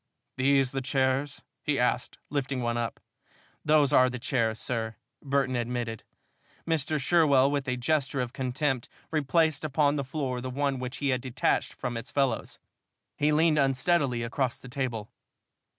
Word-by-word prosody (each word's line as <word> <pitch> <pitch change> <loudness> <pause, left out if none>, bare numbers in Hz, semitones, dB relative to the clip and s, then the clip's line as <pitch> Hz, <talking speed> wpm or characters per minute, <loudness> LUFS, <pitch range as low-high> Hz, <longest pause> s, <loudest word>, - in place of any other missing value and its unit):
These 135 -1 +3
the 135 - -2
chairs?" 135 +2 0 0.2
he - - 0
asked, - - 0
lifting 135 -3 -1
one 120 0 0
up. 120 -2 -3 0.6
"Those 150 -3 +4
are 130 0 +6
the 125 - -4
chairs, 115 -3 0
sir," 115 -1 -2 0.3
Burton 135 -2 0
admitted. 120 -2 -3 0.6
Mr. 155 -2 0
Sherwell, 140 -3 +4
with 140 -1 -1
a 125 0 0
gesture 140 +1 0
of 125 -1 -2
contempt, 130 -1 -1 0.2
replaced 155 0 +2
upon 145 0 +2
the 140 - -1
floor 130 -2 -3
the 130 - -4
one 140 0 -1
which 130 +1 -5
he 140 - -1
had 130 -1 +1
detached 130 -2 0
from 120 -2 -4
its 115 +3 -7
fellows. 135 -5 -1 0.6
He 150 +1 +2
leaned 155 0 +4
unsteadily 135 -2 +2
across 125 +1 -1
the 125 - -12
table. 120 -5 -3
135 Hz, 155 wpm, -28 LUFS, 125-145 Hz, 0.6 s, are